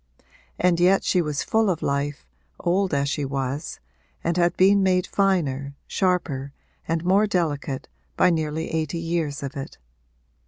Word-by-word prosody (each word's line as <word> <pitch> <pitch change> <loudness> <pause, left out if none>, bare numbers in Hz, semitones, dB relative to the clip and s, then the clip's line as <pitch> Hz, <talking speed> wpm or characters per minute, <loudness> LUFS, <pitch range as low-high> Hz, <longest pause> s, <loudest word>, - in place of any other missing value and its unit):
And 175 -1 +2
yet 185 +2 +4
she 180 - +2
was 150 -3 -2
full 220 -2 +2
of 170 -4 -1
life, 140 - -2 0.3
old 190 +2 +1
as 140 -1 +1
she 145 +1 -1
was, 135 +2 -3 0.4
and 170 0 0
had 175 -1 +2
been 195 +2 +5
made 185 -1 +2
finer, 145 -9 0
sharper 155 -8 -1 0.3
and 165 +1 -1
more 200 +4 +4
delicate, 145 -8 -1 0.3
by 180 - +5
nearly 160 -1 -2
eighty 160 0 -1
years 165 -4 -2
of 135 - -5
it. 135 -1 -7
165 Hz, 150 wpm, -24 LUFS, 140-180 Hz, 0.4 s, been